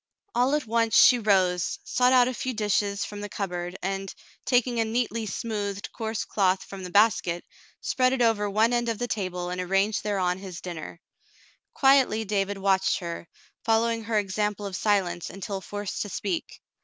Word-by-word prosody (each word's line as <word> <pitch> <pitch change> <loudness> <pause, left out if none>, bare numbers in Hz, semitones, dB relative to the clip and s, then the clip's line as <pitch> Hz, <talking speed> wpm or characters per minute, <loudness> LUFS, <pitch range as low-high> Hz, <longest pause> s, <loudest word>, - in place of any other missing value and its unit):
All 255 +4 +2
at 300 - -1
once 230 0 +1
she 245 - +7
rose, 185 -5 +2
sought 250 0 +2
out 250 -1 +6
a 255 - -2
few 255 0 -3
dishes 205 -1 0
from 205 0 -7
the 205 - -5
cupboard, 180 -2 -4
and, 195 +1 -3 0.3
taking 245 -1 +2
a - - +4
neatly 230 0 -1
smoothed, 205 -1 -4
coarse 225 -1 -3
cloth 190 -2 +1
from 195 -1 -9
the 180 - -6
basket, 185 -3 +2 0.4
spread 255 0 +2
it 265 - -1
over 225 -3 +2
one 220 +4 +2
end 240 -1 +1
of 225 - -1
the 245 - -2
table 180 -5 -3
and 180 0 -2
arranged 195 +3 +1
thereon 190 -3 0
his 185 -3 -8
dinner. 170 -1 -7 0.8
Quietly 265 -5 +4
David 200 0 -1
watched 195 0 +2
her, 170 -2 -6 0.4
following 225 0 +1
her 225 -1 0
example 210 +1 -1
of 195 -2 -4
silence 190 -4 0
until 195 0 -5
forced 205 +1 -5
to 205 - -3
speak. 335 - -4
205 Hz, 175 wpm, -26 LUFS, 190-230 Hz, 0.8 s, she